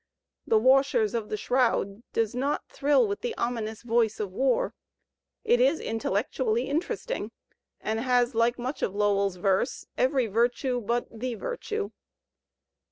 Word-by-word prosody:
"The 220 - +4
Wajshers 260 -3 +4
of 225 -3 -2
the 215 - -2
Shroud" 230 -4 +1
does 225 -2 0
not 275 +4 -1
thrill 295 - +2
with 405 0 -3
the 475 -2 -3
ominous 225 -2 -3
voice 230 -2 +1
of 205 -3 -3
War. 270 - +1 0.7
It 475 +2 +3
is - - +4
intellectually 225 +2 -1
interesting, 335 - -2 0.5
and 220 +1 -2
has, 245 0 +2
like 230 +1 +2
much 255 +4 -4
of 195 - -1
Lowell's 200 -2 +2
verse, 190 +6 0
every 260 -1 +3
virtue 240 +3 0
but 235 +3 0
ike 235 +1 -4
virtue. 435 -4 -4
240 Hz, 140 wpm, -27 LUFS, 220-270 Hz, 0.7 s, The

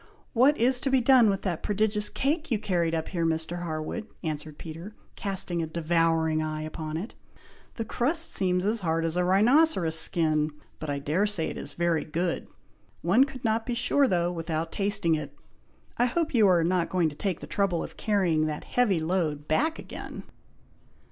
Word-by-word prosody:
"What 265 +5 +4
is 250 +2 +4
to 275 - 0
be 265 -1 +4
done 250 -2 +5
with 195 -1 -1
that 175 -5 -2
prodigious 210 0 0
cake 305 +4 -1
you 230 - +1
carried 175 -5 0
up 160 -1 -3
here, 170 -3 -2
Mr. 165 +1 -1
Harwood?" 165 +6 -4 0.2
answered 155 -1 -5
Peter, 165 +6 -9 0.2
casting 190 -3 -3
a 160 - -2
devouring 165 -1 +1
eye 155 0 -3
upon 155 0 -5
it; 200 +8 -6 0.6
"the 225 - -3
crust 305 +9 0
seems 180 -1 +2
as 220 +3 +2
hard 165 -3 0
as 165 0 -1
a 180 - +2
rhinoceros' 195 - +3
skin, 155 -2 +2 0.3
but 155 - -5
I 140 - -1
dare 155 +9 0
say 185 -6 0
it - - -7
is - - -7
very 170 -2 +1
good. 170 +3 -2 0.6
One 260 +3 +5
could 260 -2 -10
not 225 0 +1
be 245 - -3
sure 275 +3 +3
though, 175 -4 +1
without 165 -1 -3
tasting 200 -4 +1
it! 145 -2 -3 0.6
I 245 - +5
hope 320 +5 -1
you 220 -4 +5
are 175 -3 +4
not 175 0 +1
going 175 -3 +1
to 145 - -11
take 185 +1 -2
the - - -8
trouble 195 -4 0
of - - -9
carrying 175 -7 +1
that 150 -1 -4
heavy 215 -8 +1
load 160 -3 -1
back 315 - +1
again?" - - -8
175 Hz, 190 wpm, -27 LUFS, 160-220 Hz, 0.6 s, done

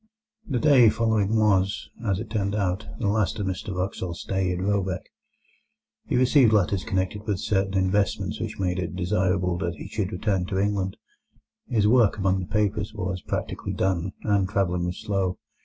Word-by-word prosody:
The 130 - 0
day 130 -4 +6
following 110 -1 +1
was, 100 -3 +2
as 100 -4 0
it 110 -1 -7
turned 100 -2 -1
out, 95 0 -1
the 115 - -1
last 105 -1 +1
of 105 - -2
Mr 95 +2 -3
Wraxall's 90 -2 -3
stay 95 -1 -1
at 90 - -2
Råbäck. 95 -1 -1 1.0
He - - 0
received 125 -1 +5
letters 100 -2 +2
connected 95 +3 -2
with 105 -3 0
certain 95 -1 0
investments 95 +2 0
which - - -4
made 90 -1 0
it 85 -2 -3
desirable 90 -1 0
that 85 -2 -2
he - - -8
should 105 -2 -3
return 95 -1 -1
to 95 - -2
England; 100 -1 0 0.7
his 110 -4 +2
work 115 -3 +4
among 95 -1 +1
the 90 - -5
papers 105 0 -1
was 95 -2 -3
practically - - -4
done, 95 0 0
and 100 -3 +1
travelling 90 -3 0
was 90 +1 -4
slow. 95 -4 -1
95 Hz, 175 wpm, -25 LUFS, 95-105 Hz, 1.0 s, day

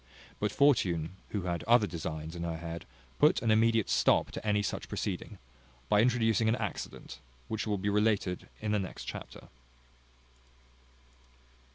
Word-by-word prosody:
But 105 - 0
Fortune, 95 - +2
who 100 -3 -3
had 85 -1 -2
other 115 -1 +5
designs 80 -2 -5
in 85 - -6
her 85 -1 -2
head, 85 0 -6 0.3
put 150 - +5
an 115 - +3
immediate 110 -1 +3
stop - - +3
to - - -6
any 105 -1 +1
such - - -4
proceeding, - - -4 0.5
by 105 - +5
introducing 115 -2 +3
an 115 - +3
accident, 110 -5 -5 0.3
which 110 0 -3
will 105 -1 0
be 100 +2 -3
related 105 -3 +1
in 105 -1 -1
the 105 - +2
next 95 -3 -6
chapter. - - -8
105 Hz, 150 wpm, -31 LUFS, 85-110 Hz, 0.5 s, other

